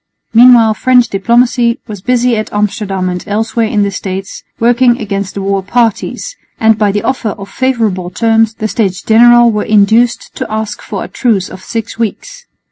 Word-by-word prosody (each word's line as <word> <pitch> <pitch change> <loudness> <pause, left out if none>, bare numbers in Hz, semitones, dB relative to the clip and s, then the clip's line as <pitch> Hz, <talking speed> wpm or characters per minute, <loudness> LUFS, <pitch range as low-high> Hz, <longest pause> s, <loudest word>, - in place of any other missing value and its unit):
Meanwhile 235 -1 +6
French 250 +1 +2
diplomacy 235 +3 +1
was 210 -5 -8
busy 250 +2 +1
at 215 0 -4
Amsterdam 205 -2 -2
and 180 0 -4
elsewhere 220 +2 -1
in 210 -1 0
the 200 - -1
States, 190 0 -6 0.2
working 240 +1 +3
against 200 -2 -4
the 200 - -4
war 195 0 -1
parties; 235 - -2 0.2
and 220 0 +4
by 210 -1 +1
the 205 +1 -2
offer 255 -4 -1
of 200 -1 -9
favourable 225 -9 -1
terms 225 +1 +1
the 215 - -3
States 190 -5 -2
General 240 +1 +5
were 210 -1 -1
induced 220 +3 +2
to - - -5
ask 215 -1 -4
for - - -5
a - - -7
truce 215 -7 -1
of 185 - -11
six 225 -1 -5
weeks. - - -5
220 Hz, 175 wpm, -12 LUFS, 200-240 Hz, 0.2 s, Meanwhile